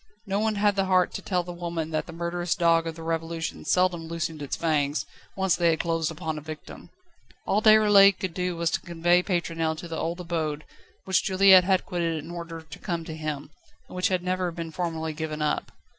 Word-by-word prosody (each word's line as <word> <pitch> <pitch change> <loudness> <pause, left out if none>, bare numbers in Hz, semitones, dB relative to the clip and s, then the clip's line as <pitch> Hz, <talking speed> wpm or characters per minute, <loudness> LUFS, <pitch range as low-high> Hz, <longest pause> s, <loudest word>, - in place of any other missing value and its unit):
No 200 -1 -1
one 220 0 +1
had 205 0 +2
the 195 -1 +1
heart 185 -1 +2
to - - -5
tell 180 -2 -1
the 175 - -7
old 175 0 -11
woman 165 -2 -3
that 155 - -2
the - - -8
murderous 170 +1 -2
dog 165 -1 +3
of 165 - -4
the 165 - -9
Revolution 165 0 -3
seldom 180 -3 +1
loosened 165 -2 -4
its 140 - -3
fangs, 150 -3 0 0.3
once 190 -2 +2
they 175 -1 +3
had 160 - +1
closed 165 -2 0
upon 160 -1 -4
a - - -12
victim. 155 +1 -10 0.6
All 210 - +1
Déroulède 205 -3 +7
could 185 -3 -3
do 180 0 -2
was 170 -1 0
to - - -1
convey 175 +1 +2
Pétronelle 165 -3 -1
to 170 - -7
the 165 -1 -4
old 170 +2 -2
abode, 160 -4 -3 0.4
which 190 -2 +2
Juliette 190 -1 +6
had 190 -1 +2
quitted 170 -3 -1
in 155 +2 -7
order 170 -1 -7
to 155 -1 -11
come 170 -4 -3
to 160 - -6
him, 155 -2 -5 0.4
and - - -11
which 180 0 +1
had 185 -2 -1
never 185 0 -1
been 165 -1 -6
formally 160 -2 -3
given 155 0 -4
up. 150 -1 -1
170 Hz, 220 wpm, -26 LUFS, 160-180 Hz, 0.6 s, Déroulède